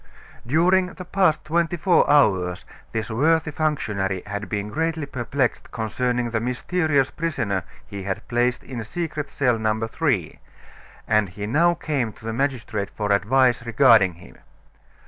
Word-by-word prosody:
During 180 +6 +3
the 185 - -8
past 180 -3 +1
twenty 170 +2 0
four 175 +2 +3
hours 95 -11 +3 0.3
this 110 0 -3
worthy 160 +6 +2
functionary 105 - -1
had 100 0 -5
been 105 0 -3
greatly 160 +1 -1
perplexed 130 -1 -2
concerning 120 +2 -1
the 115 - 0
mysterious 135 +4 0
prisoner 120 - -2 0.2
he 100 +5 -7
had 95 0 -4
placed 120 +1 0
in 125 -3 -6
secret 150 +3 -4
cell 125 -5 +1
No. 110 0 0
3, 115 - -1 0.7
and 110 -3 +2
he 100 +3 -6
now 170 +10 +3
came 140 -9 -2
to 110 - -16
the 115 - -3
magistrate 120 -5 -2
for 105 -1 -3
advice 120 +4 +3
regarding 115 -6 +5
him. 85 - -16
125 Hz, 145 wpm, -23 LUFS, 110-155 Hz, 0.7 s, regarding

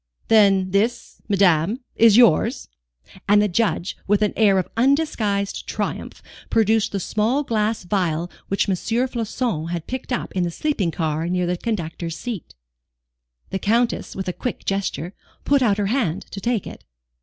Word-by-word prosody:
"Then 195 -4 +4
this, 215 +5 -1
madame, 195 - +3
is 225 -2 +6
yours?" 235 -10 +4 0.6
And 205 0 +6
the 210 - +3
Judge, 205 -1 0
with 205 +1 +3
an 210 - +1
air 205 -3 +4
of 185 - 0
undisguised 230 -7 0
triumph, - - -4 0.3
produced 220 -1 +2
the 200 - -2
small 225 +9 0
glass 220 -4 -1
vial 175 -3 -1 0.2
which 195 - 0
M. 195 - +2
Floçon 230 -5 -2
had 170 -2 -4
picked 260 +1 -6
up 245 - -2
in 185 - +1
the 175 - 0
sleeping 200 - -1
car 160 0 -2
near 180 0 0
the 175 +1 0
conductor's 170 -5 -4
seat. 235 -8 -6 1.0
The 195 - -2
Countess, 230 +5 0
with 190 -1 -4
a 180 - -1
quick 250 +4 -5
gesture, 195 -3 -2 0.3
put 280 -1 +3
out 210 -5 +3
her 205 - 0
hand 195 - 0
to 195 - -6
take 235 -3 -1
it. - - -10
205 Hz, 160 wpm, -22 LUFS, 180-230 Hz, 1.0 s, is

